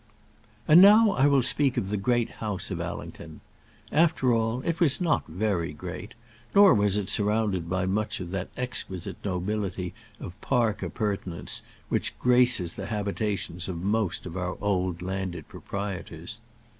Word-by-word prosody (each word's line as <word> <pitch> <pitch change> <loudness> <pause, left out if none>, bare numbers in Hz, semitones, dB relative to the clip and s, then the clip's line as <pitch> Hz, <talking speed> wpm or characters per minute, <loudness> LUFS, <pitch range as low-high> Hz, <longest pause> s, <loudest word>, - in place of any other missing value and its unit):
And 160 +4 +8
now 210 +2 +8
I 140 -5 +3
will 140 -3 +4
speak 135 +1 +1
of 95 - -1
the 105 - -1
Great 120 +3 0
House 105 -4 -3
of - - -3
Allington. - - -7 0.5
After 155 -6 +3
all, 115 +2 0
it 170 +4 -2
was 155 -6 +3
not 170 -4 +1
very 85 -2 -1
great; 90 +6 -8 0.4
nor 200 -1 +8
was 100 -1 +2
it 100 -2 -2
surrounded 105 -5 +1
by 95 +1 0
much 105 +3 -1
of 90 -2 -6
that 95 -1 -3
exquisite 110 -8 -4
nobility 95 -1 -3 0.3
of 95 +5 -9
park 115 -5 +1
appurtenance 100 -5 -1 0.3
which - - -1
graces 125 -8 +3
the 100 - -5
habitations 100 -4 -2
of 85 -1 -5
most 100 -3 -1
of 90 -1 -7
our 90 0 -3
old 90 -3 -1
landed 95 -4 -4
proprietors. 100 +1 -6
100 Hz, 150 wpm, -27 LUFS, 90-120 Hz, 0.5 s, And